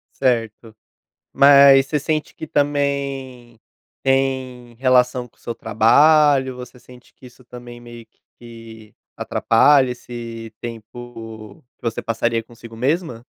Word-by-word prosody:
Certo. 115 -3 -2 0.6
Mas 140 -1 +6
você 150 +2 -1
sente 155 +1 -3
que 160 - -8
também 140 -5 -3 0.4
tem 130 -2 -2
relação 125 0 +1
com - - -37
o - - -31
seu 120 - -6
trabalho, 135 +5 +3
você 125 0 -11
sente 125 0 -18
que 130 - -16
isso 125 +1 -18
também 120 0 -12
meio 120 -1 -13 0.3
que 115 -2 -14 0.2
atrapalha 130 +3 +2
esse 115 -2 -9
tempo 115 -2 -10 0.2
que - - -49
você 115 -1 -3
passaria 115 0 -2
consigo 115 0 -15
mesma? 130 -2 -2
125 Hz, 120 wpm, -19 LUFS, 115-135 Hz, 0.6 s, Mas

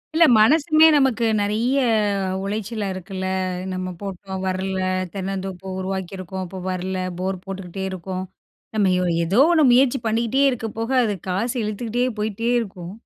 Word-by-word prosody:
இல்ல, 335 0 +7
மனசுமே 310 +6 +6
நமக்கு 260 -4 +2
நெறைய 220 +6 +1 0.7
உளைச்சலா 210 +1 -3
இருக்குல்ல? 190 0 -6 0.5
நம்ம 185 0 -3
போட்டோம் 190 -1 -6
வரலை. 190 0 -1 0.3
தென்னந்தோப்பு 190 -1 -5
உருவாக்கியிருக்கோம், 190 0 -4
அப்போ 185 +1 -8
வரல. 185 +1 -3 0.2
போர் 185 -1 -2
போட்டுக்கிட்டே 190 0 -6
இருக்கோம். 185 +1 -5 0.5
நம்ம 205 -2 +3
எ - - +1
ஓ - - 0 0.2
ஏதோ 195 +9 +2
ஒண்ணு 315 -3 +4
முயற்சி 260 +1 +4
பண்ணிட்டே 235 +5 +1
இருக்க 225 -2 -3
போக, 225 +2 -2
அது 210 -3 0
காசு 230 +8 -1
இழுத்துக்கிட்டே 230 +3 -1 0.2
போயிட்டே 220 +2 -1
இருக்கும். 185 -3 -8
195 Hz, 140 wpm, -22 LUFS, 185-230 Hz, 0.7 s, இல்ல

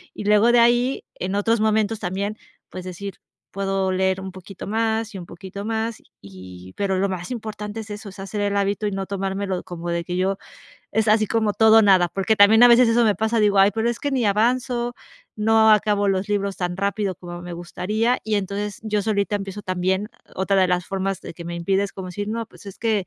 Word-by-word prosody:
Y - - -6
luego 210 +3 +5
de 240 - +4
ahí, 240 +3 +3
en 190 +2 -3
otros 225 +3 +1
momentos 220 0 +1
también, 200 +2 -3 0.3
pues 185 - -7
decir, 185 +1 -7 0.4
puedo 195 -1 -1
leer 190 0 0
un 190 0 -6
poquito 185 +1 -10
más 225 +1 -1
y - - -4
un 180 - -8
poquito 200 +2 -8
más 225 0 -2 0.2
y 95 -1 -12
pero 195 -2 0
lo 200 +1 +1
más 180 +1 -5
importante 215 -2 -5
es 215 - -11
eso, 210 +1 -7
es 195 - -14
hacer 195 +2 -5
el 205 0 0
hábito 200 +1 0
y - - -2
no 195 -1 -4
tomármelo 195 -1 -2
como 175 -1 -6
de 170 0 -2
que 180 - -4
yo 190 +1 0 0.6
es 220 +1 +1
así 215 0 +4
como 220 0 +1
todo 220 0 +6
o - - +6
nada. 190 -4 +5
Porque 195 +5 0
también 215 +3 +7
a 245 - +10
veces 240 0 +6
eso 235 +1 +4
me 210 -2 +3
pasa, 220 +4 0
digo: 205 -2 +3
"Ay, 195 +1 +6
pero 225 +1 0
es 235 - -6
que 285 - -1
ni 255 -5 +1
avanzo, 240 +3 +1 0.4
no 220 +1 +4
acabo 210 -1 +3
los 195 +1 0
libros 200 -1 -1
tan 175 -1 -2
rápido 200 0 -1
como 175 -1 -9
me 175 0 -7
gustaría". 215 +8 -1
Y 220 - -1
entonces, 200 +1 -3
yo 210 -1 0
solita 205 0 0
empiezo 200 0 -6
también 185 +2 -1 0.2
otra 190 +1 0
de 185 - +3
las 180 -1 0
formas 195 -1 -2
de - - -8
que 170 - -9
me 170 - -4
impide 190 +3 +1
es 200 - -6
como 190 -1 -6
decir: 205 +3 -5
"No, 230 +1 -2
pues 210 - -17
es 200 - -9
que, 215 -5 0
200 Hz, 225 wpm, -22 LUFS, 190-220 Hz, 0.6 s, a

